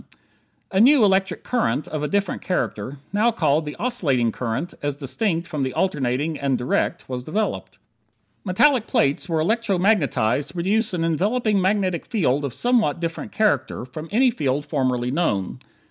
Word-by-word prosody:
A 190 Hz, -, +1 dB
new 260 Hz, +2 st, +6 dB
electric 195 Hz, -1 st, +1 dB
current, 235 Hz, -, 0 dB
of 155 Hz, -, -4 dB
a 150 Hz, -, -1 dB
different 200 Hz, 0 st, -1 dB
character 140 Hz, -, -3 dB, 0.2 s
now 220 Hz, +4 st, +3 dB
called 155 Hz, -8 st, +1 dB
the 150 Hz, -, -5 dB
oscillating 150 Hz, -, 0 dB
current 125 Hz, +9 st, -3 dB
as 145 Hz, -1 st, -2 dB
distinct 165 Hz, -, -1 dB
from 150 Hz, -4 st, -4 dB
the 130 Hz, -1 st, -2 dB
alternating 145 Hz, -2 st, -1 dB
and 135 Hz, -2 st, 0 dB
direct 125 Hz, -, -1 dB
was 125 Hz, -1 st, -4 dB
developed. 205 Hz, +10 st, -3 dB, 0.7 s
Metallic 230 Hz, +5 st, +3 dB
plates 140 Hz, +6 st, +1 dB
were 165 Hz, -1 st, +1 dB
electro 215 Hz, +3 st, +1 dB
magnetized 145 Hz, -, +1 dB
to -, -, -10 dB
produce 195 Hz, +4 st, +1 dB
an 165 Hz, -, -1 dB
enveloping 205 Hz, +5 st, +1 dB
magnetic 190 Hz, -2 st, 0 dB
field 145 Hz, -, +1 dB
of 140 Hz, -, -2 dB
somewhat 240 Hz, -, +2 dB
a -, -, -13 dB
different 165 Hz, -1 st, -4 dB
character 215 Hz, -, 0 dB
from 155 Hz, +5 st, -8 dB
any 250 Hz, +4 st, +4 dB
field 145 Hz, -, -1 dB
formerly 130 Hz, -4 st, -1 dB
known. 115 Hz, -, -1 dB
165 Hz, 160 wpm, -22 LUFS, 140-205 Hz, 0.7 s, new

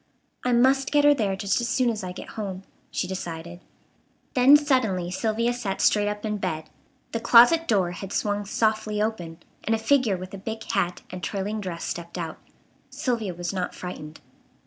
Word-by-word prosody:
"I 250 Hz, -, +1 dB
must 265 Hz, +3 st, +3 dB
get 290 Hz, -1 st, +4 dB
her 290 Hz, -, +8 dB
there 210 Hz, -8 st, 0 dB
just 200 Hz, +4 st, 0 dB
as 235 Hz, -, -2 dB
soon 250 Hz, -1 st, +2 dB
as 215 Hz, -3 st, -5 dB
I 180 Hz, -, -4 dB
get 180 Hz, -, -9 dB
home," 195 Hz, -3 st, -5 dB, 0.3 s
she 180 Hz, -, -2 dB
decided. 175 Hz, -2 st, -6 dB, 0.7 s
Then 270 Hz, +2 st, +8 dB
suddenly 225 Hz, -, +1 dB
Sylvia 225 Hz, +4 st, 0 dB
sat 210 Hz, -6 st, -3 dB
straight 205 Hz, -1 st, +3 dB
up 210 Hz, +1 st, -3 dB
in 210 Hz, -1 st, -1 dB
bed. 160 Hz, -5 st, -3 dB, 0.4 s
The 230 Hz, -, -2 dB
closet 245 Hz, +9 st, +6 dB
door 190 Hz, -5 st, +2 dB
had 195 Hz, +2 st, -7 dB
swung 205 Hz, 0 st, -1 dB
softly 215 Hz, 0 st, 0 dB
open, 175 Hz, -6 st, -3 dB, 0.2 s
and 225 Hz, -, +1 dB
a -, -, 0 dB
figure 225 Hz, -3 st, +2 dB
with 185 Hz, +1 st, -9 dB
a 195 Hz, -, -6 dB
big 220 Hz, +2 st, -5 dB
hat 175 Hz, 0 st, -1 dB
and 180 Hz, 0 st, -6 dB
trailing 205 Hz, +2 st, -2 dB
dress 175 Hz, -4 st, -5 dB
stepped 170 Hz, +1 st, -5 dB
out. 165 Hz, -2 st, -5 dB, 0.5 s
Sylvia 225 Hz, -8 st, -2 dB
was 175 Hz, +2 st, -4 dB
not 185 Hz, -2 st, -3 dB
frightened. 155 Hz, -4 st, -8 dB
205 Hz, 185 wpm, -25 LUFS, 180-235 Hz, 0.7 s, her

